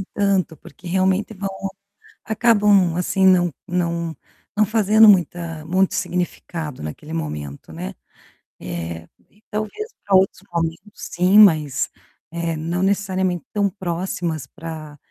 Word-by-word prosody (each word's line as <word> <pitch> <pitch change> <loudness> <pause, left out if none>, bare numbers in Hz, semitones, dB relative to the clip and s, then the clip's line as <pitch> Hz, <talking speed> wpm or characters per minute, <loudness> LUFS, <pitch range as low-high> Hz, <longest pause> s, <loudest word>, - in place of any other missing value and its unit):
Tanto 195 -5 +1
porque, 175 +6 -13
realmente, 190 +4 +1
vão, 195 -1 -4 0.8
acabam, 205 -5 +4
assim, 190 +2 +2
não 180 -2 +5 0.2
não 170 -2 -2 0.4
não 215 0 +4
fazendo 215 +1 +5
muita 170 -4 +2
muito 185 +4 +1
significado 170 - -3
naquele 150 - -7
momento, 75 - -5
né. 60 - -6 0.7
Eh, 85 -2 -5 0.4
talvez, 215 - -4 0.2
para 200 - +3
outros 190 0 +3
momentos, 165 -1 -1 0.2
sim, 180 +4 +2
mas, 155 -10 +5 0.4
eh, 170 -1 -2
não 165 +3 -2
necessariamente 190 -3 0
tão 205 -1 +2
próximas 175 -5 -3
pra 160 -2 -8
180 Hz, 115 wpm, -21 LUFS, 160-195 Hz, 0.8 s, não